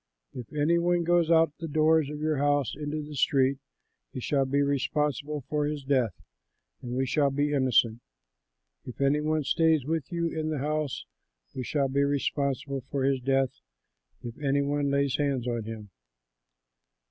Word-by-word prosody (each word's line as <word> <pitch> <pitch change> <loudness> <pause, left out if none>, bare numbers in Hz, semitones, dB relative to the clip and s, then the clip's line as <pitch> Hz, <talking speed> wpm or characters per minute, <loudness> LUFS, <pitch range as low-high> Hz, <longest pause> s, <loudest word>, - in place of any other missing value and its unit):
If 125 -3 -8
any 155 +3 +2
one 175 0 +1
goes 170 -1 +2
out 165 -1 +5
of - - -34
the 165 - -4
doors 155 0 +3
of 150 0 -6
your 155 -1 0
house 145 -3 +1
into 150 +1 -4
the 150 0 -9
street, 135 0 +2 0.5
he - - -6
shall 135 +2 +1
be 140 +2 +1
responsible 145 +1 -1
for 150 +3 -1
his 150 -2 -4
death 130 -8 +1 0.7
and 125 -2 -5
we 130 +1 +1
shall 140 +2 +2
be 145 +2 0
innocent. 125 -4 +2 0.8
If 125 - -10
any 140 +2 +2
one 155 0 0
stays 160 -1 +2
with 160 -1 -2
you 170 -1 0
in 155 -1 -3
the 155 - -2
house, 150 0 -2 0.5
we 130 - -4
will 140 -2 +3
be 140 +1 +2
responsible 140 -1 -1
for 140 -2 -1
his 135 -1 +1
death 135 0 0 0.6
if 120 -1 -6
any 140 -1 +1
one 145 0 0
lays 140 -1 +1
hands 140 -4 -1
on 120 -3 -2
him. 110 -2 -8
140 Hz, 170 wpm, -28 LUFS, 135-150 Hz, 0.8 s, out